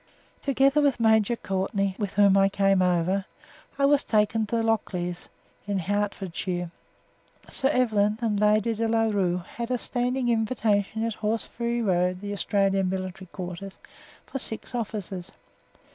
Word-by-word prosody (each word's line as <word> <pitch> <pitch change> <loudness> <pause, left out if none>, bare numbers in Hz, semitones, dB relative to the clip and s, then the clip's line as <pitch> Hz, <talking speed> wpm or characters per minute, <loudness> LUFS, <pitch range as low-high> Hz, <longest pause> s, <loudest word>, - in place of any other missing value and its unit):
Together 275 +1 +3
with 280 -4 +2
Major 220 0 +4
Courtenay 195 -1 -1
(with 205 -3 -3
whom 200 -1 +5
I 195 0 +5
came 195 -1 +2
over) 180 +2 +1 0.5
I 280 - +3
was 285 0 +4
taken 215 0 +1
to 235 - -2
Lockleys, 180 -6 -2 0.4
in 200 -1 0
Hertfordshire. 190 -2 -2 0.8
Sir 265 - +1
Evelyn 215 -6 +2
and 220 -4 0
Lady 210 +2 +3
de 225 +1 -1
La 225 0 +2
Rue 185 -5 0
had 235 0 -3
a 250 - +1
standing 245 +1 -1
invitation 220 -2 +1
at 230 0 -1
Horseferry 235 +2 -2
Road, 180 -2 +1
the 205 +1 -5
Australian 195 -1 +1
Military 185 0 -5
Headquarters, 180 +2 -7 0.5
for 270 - -5
six 225 0 -6
officers. 200 -6 -4
205 Hz, 140 wpm, -26 LUFS, 190-230 Hz, 0.8 s, whom